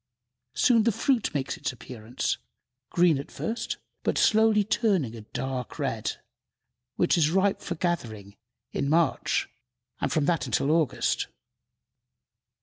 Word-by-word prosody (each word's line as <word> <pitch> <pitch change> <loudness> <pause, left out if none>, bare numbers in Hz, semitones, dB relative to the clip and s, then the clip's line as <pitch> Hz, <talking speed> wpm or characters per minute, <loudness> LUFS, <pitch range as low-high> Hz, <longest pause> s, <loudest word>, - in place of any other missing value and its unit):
Soon 235 -3 +5
the 230 +2 +3
fruit 230 +2 +1
makes 140 -3 -2
its - - -2
appearance, 120 -1 -4 0.5
green 175 -5 +3
at 140 - -7
first, 225 +2 -3 0.2
but - - 0
shortly 220 -1 +4
turning 190 - +1
a 115 - -8
dark 125 +3 -5
red, - - -2 0.8
which - - +2
is 155 -2 +4
ripe 195 +3 +2
for 175 - -4
gathering 110 - -3 0.4
in 140 - -1
March, 160 -2 +2 0.5
and - - -1
from 155 -2 +2
that 170 +1 +1
until 140 - +1
August. 160 -4 +1
160 Hz, 130 wpm, -27 LUFS, 130-200 Hz, 0.8 s, Soon